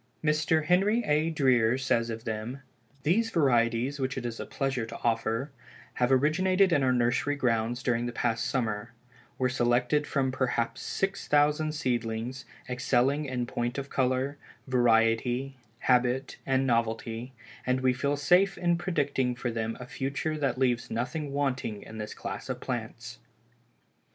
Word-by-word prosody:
Mr. 155 0 +2
Henry 200 +7 +3
A. 150 +2 +2
Dreer 130 -6 +3
says 120 -3 +1
of 115 0 -5
them: 110 +5 -4 0.4
"These 220 +10 +2
varieties 130 - +2
which 130 0 -2
it 125 - -4
is 115 -1 -4
a - - -5
pleasure 135 -4 -2
to - - -7
offer, 115 +3 0 0.4
have 125 +1 +1
originated 185 +7 +3
in 145 - +3
our 130 -1 +3
nursery 125 +4 +1
grounds 120 -2 0
during 120 -2 0
the - - -3
past 115 -1 -1
summer, 115 -2 -2 0.4
were 130 - +2
selected 125 +4 +1
from 135 -2 0
perhaps 130 -3 -1
six 195 +1 -2
thousand 150 +1 +3
seedlings 120 -2 -2 0.2
excelling 130 +3 +1
in 125 -3 -2
point 120 +1 -3
of 140 0 -5
color, 130 +2 0 0.3
variety, 120 +1 +2 0.2
habit 125 +1 +1
and 135 0 +2
novelty, 115 0 -1 0.3
and 130 0 0
we 130 -1 +3
feel 140 +3 -1
safe 180 +6 +3
in 175 -1 +1
predicting 140 -8 0
for 120 0 -3
them 115 0 -3
a 125 - -7
future 140 +5 -3
that 135 -5 -1
leaves 125 -2 +1
nothing 140 +6 -3
wanting 135 -7 -2
in 110 0 -9
this 105 0 -5
class - - -6
of - - -3
plants." 120 -1 -5
130 Hz, 150 wpm, -28 LUFS, 120-145 Hz, 0.4 s, Henry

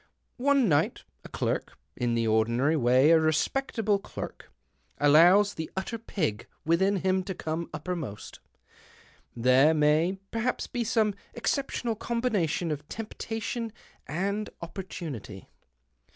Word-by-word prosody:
One 275 -2 +3
night 145 -5 +1 0.2
a - - -11
clerk - - -2
— - - -47
in 120 -1 0
the 115 0 +1
ordinary 115 +7 +2
way 130 +2 +4
a 165 - +7
respectable 205 - +1
clerk - - -8 0.2
— - - -41
allows 175 +8 +6
the 160 - -5
utter 225 +5 -3
pig 155 - -3 0.2
within 190 +5 +3
him 190 0 +2
to 190 - -4
come 160 +1 -4
uppermost. 155 - -6 1.0
There 130 +6 +5
may, 155 +5 +3
perhaps, 230 +2 -1
be 245 - -3
some 220 -2 +2 0.2
exceptional 240 -1 -1
combination 205 -9 -1
of 150 0 -5
temptation 225 +1 -4 0.4
and 200 +7 -2
opportunity. 165 - -7
170 Hz, 125 wpm, -28 LUFS, 150-215 Hz, 1.0 s, a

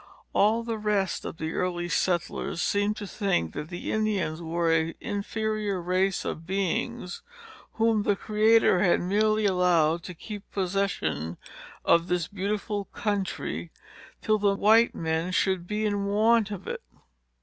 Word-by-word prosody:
All 220 +3 +3
the 230 -1 -3
rest 205 -3 0
of - - -6
the 160 0 -3
early 175 -1 -1
settlers 175 -1 -1
seemed 205 +3 +1
to 205 - -5
think 190 - -1
that 150 - -5
the 175 - -5
Indians 200 -7 0
were 165 0 +1
an 165 0 +1
inferior 210 -1 -2
race 185 +2 0
of 165 +1 -5
beings, 190 -1 -2 0.5
whom 225 -1 +2
the 205 -1 +2
Creator 215 -1 +4
had 180 -2 +3
merely 215 +3 +2
allowed 175 -4 +3
to 180 - -7
keep 205 +4 -8
possession 175 - -1 0.5
of 170 +1 +4
this 180 -2 0
beautiful 205 +1 -2
country, 190 - -3 0.5
till 215 -1 +2
the 200 -1 +2
white 220 +4 +4
men 160 +2 -1
should 185 -1 +1
be 215 +2 -1
in 205 -1 0
want 215 +2 +3
of 205 -3 -6
it. - - -4
195 Hz, 145 wpm, -27 LUFS, 175-210 Hz, 0.5 s, Creator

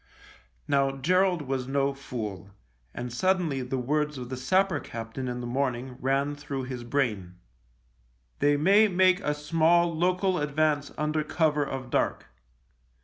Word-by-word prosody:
Now 135 -1 +1
Gerald 180 +3 +2
was 130 -2 -3
no 140 0 +1
fool, 110 -8 -6 0.4
and 120 - -6
suddenly 175 -2 +1
the 130 +1 -3
words 150 +3 -1
of 125 -1 -7
the 130 - -3
sapper 175 +6 +1
captain 115 +2 -6
in 125 0 -4
the - - -5
morning 125 0 -2
rang 135 +2 0
through 140 -2 -5
his 125 -1 -6
brain. 110 -9 -1 0.5
" - - -40
They 145 0 +3
may 200 +8 +5
make 185 -1 +3
a 150 -7 -1
small 165 +3 +2
local 180 +2 +1
advance 150 0 0
under 155 0 0
cover 150 -1 +1
of 130 -3 -5
dark." - - 0
140 Hz, 145 wpm, -27 LUFS, 125-155 Hz, 0.5 s, may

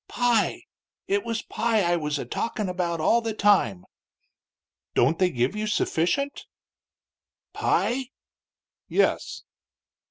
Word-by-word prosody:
"Pie. 245 -2 +1 0.4
It 400 0 +1
was 230 0 -3
pie 225 -3 0
I 175 0 +2
was 150 -3 -2
a - - -4
talkin' 215 -3 -3
about 175 -2 -2
all 230 +9 +3
the 225 -2 -3
time." 190 - +2 1.1
"Don't 150 +7 +3
they 185 -1 +4
give 125 +1 -1
you 215 0 -2
sufficient?" 230 - 0 1.1
"Pie?" 260 +1 0 0.8
"Yes." - - 0
205 Hz, 115 wpm, -25 LUFS, 165-235 Hz, 1.1 s, they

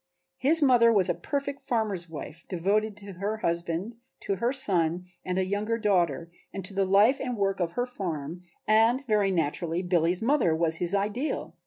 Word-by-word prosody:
His 310 +4 +3
mother 240 -4 +6
was 195 -4 +2
a - - +3
perfect 280 -1 -4
farmer's 210 -8 -2
wife, 160 +1 -8
devoted 205 +4 0
to 200 -1 -8
her 210 +3 -2
husband, 170 +4 -2 0.2
to 195 - -2
her 235 +6 +1
son 180 -9 0 0.2
and 180 0 -2
a 190 - +1
younger 210 +4 -1
daughter, 170 - 0 0.2
and 195 -2 -6
to 195 - -4
the 195 0 +1
life 205 +8 +4
and 250 -3 -3
work 195 -1 0
of 170 -1 -1
her 245 - 0
farm 175 - -5 0.3
and 225 +5 +4
very 210 -4 +2
naturally 170 0 -1
Billy's 175 0 +1
mother 230 - +2
was 160 0 0
his 175 +3 -1
ideal. 210 +9 -2
195 Hz, 180 wpm, -27 LUFS, 175-230 Hz, 0.3 s, mother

